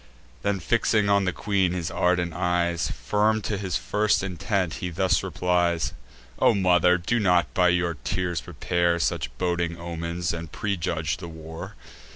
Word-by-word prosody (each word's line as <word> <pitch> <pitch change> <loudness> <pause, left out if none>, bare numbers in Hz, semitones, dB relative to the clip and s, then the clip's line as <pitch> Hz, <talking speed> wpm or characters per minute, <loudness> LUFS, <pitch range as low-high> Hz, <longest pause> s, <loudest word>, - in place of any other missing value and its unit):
Then 100 -1 0
fixing 105 +1 +2
on 100 -1 +3
the 95 - +1
queen 95 -2 0
his 85 -2 -3
ardent 90 -1 +1
eyes, 85 -1 0
Firm 110 +1 +1
to 105 - -1
his 95 -4 -3
first 105 +4 +1
intent, 90 0 -1
he 90 - -2
thus 95 +2 +1
replies: 85 -2 0 0.5
"O - - +4
mother, 90 -2 +4
do 105 +7 0
not 90 -6 +2
by 90 -1 +4
your 90 -1 +2
tears 90 -2 -1
prepare 85 -1 0
Such 85 -4 -1
boding 85 -2 -1
omens, 85 0 -3
and 85 -2 -6
prejudge 85 -5 -2
the 90 -1 -8
war. 80 0 -9
90 Hz, 155 wpm, -25 LUFS, 85-95 Hz, 0.5 s, O